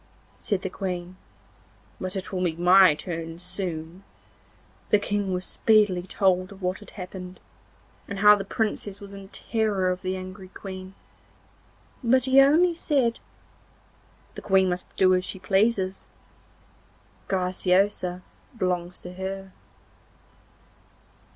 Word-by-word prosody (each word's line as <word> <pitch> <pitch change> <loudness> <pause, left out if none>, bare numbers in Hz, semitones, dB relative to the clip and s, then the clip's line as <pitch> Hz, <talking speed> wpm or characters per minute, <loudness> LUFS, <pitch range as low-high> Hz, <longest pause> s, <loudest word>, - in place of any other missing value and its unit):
said 200 -4 -1
the - - -1
Queen, 180 -1 -4 0.8
'but 185 +1 -4
it 190 +1 -4
will 185 -1 -1
be 170 -3 0
my 180 -1 +6
turn 165 0 -5
soon!' 180 -1 -5 0.9
The 210 - +6
King 205 -1 -2
was 180 0 -2
speedily 210 -5 +3
told 185 +1 0
what 185 0 -2
had 205 - -13
happened, 180 -1 -8 0.7
and 200 - -5
how 210 +1 +8
the 200 - -4
Princess 205 -1 -2
was 200 -1 -10
in 195 -1 -10
terror 205 -3 0
of 180 0 -4
the 185 0 -2
angry 185 +1 -8
Queen, 190 0 -9 1.1
but 255 +1 +4
he 265 +1 +6
only 325 +6 +5
said: 275 -8 +1 1.1
'The - - -8
Queen 190 -2 +3
must 180 0 -3
do 185 -1 +4
as 185 0 +2
she 190 - -6
pleases. 195 0 +1 1.2
Graciosa 185 0 +1 0.3
belongs 180 -3 -1
to 180 - -9
her! 190 +1 -6
190 Hz, 125 wpm, -25 LUFS, 180-205 Hz, 1.2 s, how